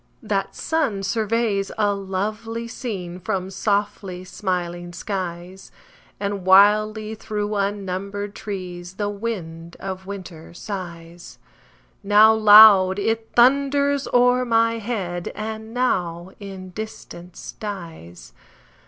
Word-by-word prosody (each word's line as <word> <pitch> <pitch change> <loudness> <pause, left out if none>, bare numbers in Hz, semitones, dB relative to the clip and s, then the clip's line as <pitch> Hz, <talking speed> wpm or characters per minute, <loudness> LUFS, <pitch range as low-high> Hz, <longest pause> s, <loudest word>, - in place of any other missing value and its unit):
That - - -2
sun 270 -12 -1
surveys 215 -1 0
a 205 -2 +2
lovely 215 +4 -4
scene 190 -7 -6
From 185 +1 -3
softly 200 -3 -2
smiling 175 -2 -4
skies; 180 -1 -6 0.5
And 200 -1 -3
wildly 210 +3 +4
through 210 -1 -4
unnumbered 200 0 -3
trees 185 -3 -7
The 205 0 -2
wind 170 -6 -6
of 190 -1 -6
winter 180 -5 -9
sighs: 175 -3 -8 0.6
Now 210 +2 +6
loud, 205 -3 +8
it 225 +2 -1
thunders 280 +2 +3
o'er 245 +1 +4
my 230 -1 +2
head, 190 -6 -4
And 220 +1 -6
now 180 -8 -1
in 190 -2 -9
distance 180 -4 -8
dies. 170 - -8
200 Hz, 100 wpm, -22 LUFS, 185-220 Hz, 0.6 s, loud